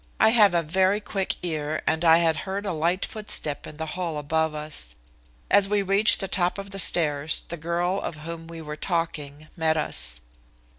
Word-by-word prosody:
I 220 Hz, -, +6 dB
have 210 Hz, -5 st, +5 dB
a 170 Hz, -, +2 dB
very 190 Hz, +5 st, +2 dB
quick 195 Hz, -2 st, -2 dB
ear, 155 Hz, -3 st, -2 dB
and 160 Hz, +1 st, +1 dB
I 165 Hz, -1 st, +7 dB
had 165 Hz, -2 st, +2 dB
heard 195 Hz, +4 st, -4 dB
a 195 Hz, -, -1 dB
light 170 Hz, +4 st, 0 dB
footstep 205 Hz, -9 st, -3 dB
in 150 Hz, -, -10 dB
the 160 Hz, -, -3 dB
hall 165 Hz, -1 st, -3 dB
above 160 Hz, +1 st, 0 dB
us. 150 Hz, -, -6 dB, 0.6 s
As 200 Hz, -1 st, +5 dB
we 205 Hz, -1 st, +2 dB
reached 195 Hz, +3 st, +4 dB
the 195 Hz, -, -2 dB
top 180 Hz, 0 st, 0 dB
of 200 Hz, 0 st, -7 dB
the 195 Hz, -, -5 dB
stairs 155 Hz, -4 st, +2 dB
the 170 Hz, -, -4 dB
girl 175 Hz, +4 st, -1 dB
of -, -, -4 dB
whom 165 Hz, 0 st, -7 dB
we 165 Hz, -1 st, -8 dB
were 150 Hz, 0 st, -6 dB
talking 155 Hz, -3 st, -3 dB
met 160 Hz, -2 st, +1 dB
us. -, -, -2 dB
165 Hz, 195 wpm, -25 LUFS, 155-190 Hz, 0.6 s, I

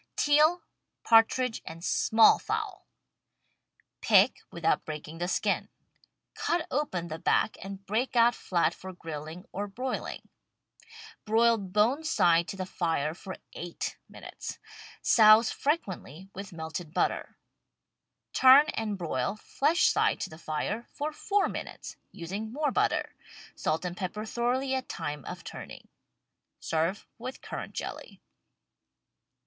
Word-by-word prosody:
TEAL, 305 Hz, +4 st, +4 dB, 0.4 s
PARTRIDGE 230 Hz, +1 st, +4 dB
AND 165 Hz, +1 st, -9 dB
SMALL 220 Hz, 0 st, +5 dB
FOWL 430 Hz, -3 st, -4 dB, 1.1 s
Pick, 210 Hz, +1 st, +4 dB
without 170 Hz, -1 st, +1 dB
breaking 155 Hz, +1 st, -7 dB
the 175 Hz, -, -1 dB
skin. 185 Hz, -, 0 dB, 0.6 s
Cut 340 Hz, -1 st, -1 dB
open 190 Hz, -, -1 dB
the 160 Hz, 0 st, -6 dB
back -, -, +2 dB
and 195 Hz, 0 st, -8 dB
break 230 Hz, +6 st, -1 dB
out 235 Hz, 0 st, +6 dB
flat 175 Hz, -7 st, 0 dB
for 190 Hz, 0 st, -9 dB
grilling 160 Hz, +1 st, -7 dB
or 205 Hz, +2 st, -3 dB
broiling. 250 Hz, +6 st, -5 dB, 1.0 s
Broil 230 Hz, +1 st, +3 dB
bone 210 Hz, +10 st, +1 dB
side 170 Hz, -, +3 dB
to 195 Hz, -, -6 dB
the 185 Hz, -, -3 dB
fire 165 Hz, -5 st, -1 dB
for 190 Hz, +2 st, -8 dB, 0.2 s
eight 175 Hz, 0 st, -5 dB
minutes. -, -, -8 dB, 0.5 s
Souse 220 Hz, 0 st, +7 dB
frequently 190 Hz, -, -3 dB
with 200 Hz, +1 st, -7 dB
melted 160 Hz, 0 st, -6 dB
butter. -, -, -1 dB, 1.0 s
Turn 265 Hz, +3 st, +8 dB
and 215 Hz, -3 st, -2 dB
broil, 160 Hz, -2 st, -2 dB
flesh 295 Hz, -, +1 dB
side -, -, +3 dB
to 195 Hz, -, -4 dB
the 155 Hz, -, -11 dB
fire, 170 Hz, +9 st, -3 dB
for 300 Hz, +1 st, -4 dB
four 400 Hz, +5 st, +1 dB
minutes, -, -, -7 dB, 0.2 s
using 195 Hz, +6 st, -5 dB
more 295 Hz, +2 st, 0 dB
butter. -, -, 0 dB, 0.4 s
Salt 155 Hz, +3 st, -1 dB
and 175 Hz, 0 st, -3 dB
pepper 210 Hz, +3 st, -4 dB
thoroughly 250 Hz, +4 st, 0 dB
at 260 Hz, -1 st, -2 dB
time 150 Hz, -1 st, -4 dB
of -, -, -7 dB
turning. -, -, -9 dB, 0.7 s
Serve 165 Hz, +5 st, -1 dB
with 255 Hz, +3 st, -7 dB
currant -, -, -6 dB
jelly. -, -, -6 dB
205 Hz, 125 wpm, -29 LUFS, 170-255 Hz, 1.1 s, Turn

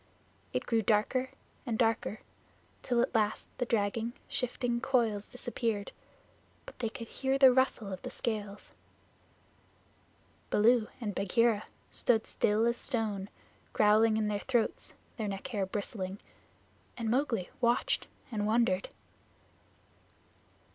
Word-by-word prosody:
It -, -, -2 dB
grew 230 Hz, -2 st, +2 dB
darker 225 Hz, +5 st, +2 dB, 0.3 s
and 235 Hz, -5 st, -2 dB
darker, 225 Hz, -2 st, +1 dB, 0.6 s
till 240 Hz, -2 st, +2 dB
at -, -, -2 dB
last 215 Hz, -2 st, +1 dB
the 245 Hz, -, 0 dB
dragging, 225 Hz, +1 st, 0 dB
shifting 245 Hz, -1 st, -1 dB
coils 230 Hz, -7 st, +1 dB
disappeared, 230 Hz, -4 st, -3 dB, 0.7 s
but -, -, -12 dB
they 230 Hz, -3 st, -1 dB
could 230 Hz, +1 st, -8 dB
hear 265 Hz, +2 st, 0 dB
the 265 Hz, -2 st, +8 dB
rustle 240 Hz, -6 st, +1 dB
of 185 Hz, -, -6 dB
the -, -, -5 dB
scales. 210 Hz, -3 st, -4 dB, 1.8 s
Baloo 225 Hz, +1 st, +4 dB
and 215 Hz, -4 st, -3 dB
Bagheera 210 Hz, +3 st, +2 dB, 0.3 s
stood 225 Hz, -3 st, +2 dB
still 215 Hz, +2 st, +2 dB
as 235 Hz, 0 st, +1 dB
stone, 210 Hz, -6 st, -2 dB, 0.4 s
growling 215 Hz, +1 st, +5 dB
in 215 Hz, -1 st, +1 dB
their 205 Hz, -1 st, -1 dB
throats, 240 Hz, 0 st, -1 dB, 0.2 s
their 220 Hz, -3 st, -2 dB
neck 195 Hz, -1 st, -5 dB
hair 205 Hz, -6 st, -1 dB
bristling, 195 Hz, -1 st, -3 dB, 0.8 s
and 230 Hz, -2 st, -3 dB
Mowgli 230 Hz, -5 st, 0 dB
watched 240 Hz, 0 st, +2 dB, 0.2 s
and 210 Hz, -2 st, -1 dB
wondered. 215 Hz, -4 st, +2 dB
225 Hz, 120 wpm, -31 LUFS, 210-240 Hz, 1.8 s, the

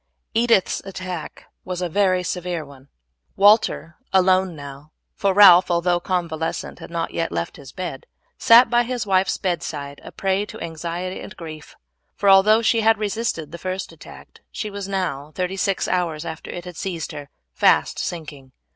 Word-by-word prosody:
Edith's 230 Hz, -4 st, +2 dB
attack 185 Hz, -3 st, -7 dB, 0.2 s
was 180 Hz, -1 st, -5 dB
a 180 Hz, -, -1 dB
very 185 Hz, +1 st, +1 dB
severe 175 Hz, -2 st, -3 dB
one. 140 Hz, -1 st, -16 dB, 0.5 s
Walter, 205 Hz, -5 st, +3 dB
alone 185 Hz, -1 st, +3 dB
now, 140 Hz, +1 st, -11 dB, 0.2 s
for 200 Hz, -, +1 dB
Ralph, 190 Hz, -2 st, +8 dB
although 175 Hz, 0 st, +1 dB
convalescent, 165 Hz, -2 st, -3 dB
had -, -, -10 dB
not 170 Hz, -1 st, -3 dB
yet 165 Hz, -, -2 dB
left 85 Hz, 0 st, -4 dB
his 135 Hz, -2 st, -12 dB
bed, 170 Hz, -8 st, -6 dB, 0.3 s
sat 235 Hz, +2 st, +7 dB
by 240 Hz, +1 st, +3 dB
his 240 Hz, -1 st, -3 dB
wife's 190 Hz, -1 st, +2 dB
bedside 155 Hz, -6 st, -4 dB
a -, -, -10 dB
prey 195 Hz, +1 st, 0 dB
to -, -, -10 dB
anxiety 170 Hz, +3 st, -5 dB
and -, -, -10 dB
grief; 155 Hz, -3 st, -10 dB, 0.4 s
for 200 Hz, -, +2 dB
although 215 Hz, +4 st, +6 dB
she 230 Hz, 0 st, +3 dB
had 225 Hz, 0 st, +4 dB
resisted 205 Hz, -7 st, -3 dB
the 170 Hz, -, -8 dB
first 185 Hz, +1 st, -4 dB
attack -, -, -14 dB
she 215 Hz, -2 st, -5 dB
was 200 Hz, -1 st, -6 dB
now, 165 Hz, -7 st, -3 dB
thirty 185 Hz, +1 st, -2 dB
six 195 Hz, 0 st, 0 dB
hours 170 Hz, -3 st, -1 dB
after 160 Hz, -1 st, -7 dB
it 175 Hz, 0 st, -7 dB
had 180 Hz, -2 st, -9 dB
seized 175 Hz, -4 st, -4 dB
her, 145 Hz, -1 st, -9 dB, 0.2 s
fast -, -, +3 dB
sinking. 150 Hz, -6 st, -6 dB
180 Hz, 165 wpm, -22 LUFS, 160-195 Hz, 0.5 s, Ralph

